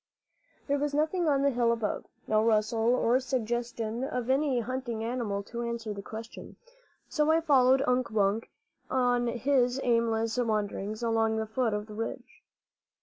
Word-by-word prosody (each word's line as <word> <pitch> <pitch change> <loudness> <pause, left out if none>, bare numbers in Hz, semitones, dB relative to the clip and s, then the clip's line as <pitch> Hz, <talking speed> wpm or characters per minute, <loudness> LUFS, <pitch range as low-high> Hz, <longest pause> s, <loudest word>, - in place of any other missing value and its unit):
There 285 0 0
was 290 0 -1
nothing 320 +3 +1
on 280 -2 +2
the 280 - +3
hill 240 -2 +2
above, 230 -2 -2 0.2
no 215 0 +2
rustle 225 +2 +2
or 250 0 +3
suggestion 240 -2 -2
of 250 -2 -2
any 270 -2 +2
hunting 240 -2 -3
animal 225 -4 -2
to 235 +3 -6
answer 235 -2 -3
the 200 - -7
question; 225 +3 -9 0.5
so 300 0 +1
I 325 - +4
followed 270 -4 +4
Unk 250 0 +1
Wunk 210 +1 0 0.4
on 245 -2 +2
his 250 +1 +1
aimless 230 -1 +1
wanderings 215 -1 -2
along 225 -1 +1
the 220 - -1
foot 220 0 0
of 210 0 -3
the 215 - -11
ridge. 225 +2 -6
235 Hz, 155 wpm, -29 LUFS, 220-255 Hz, 0.5 s, I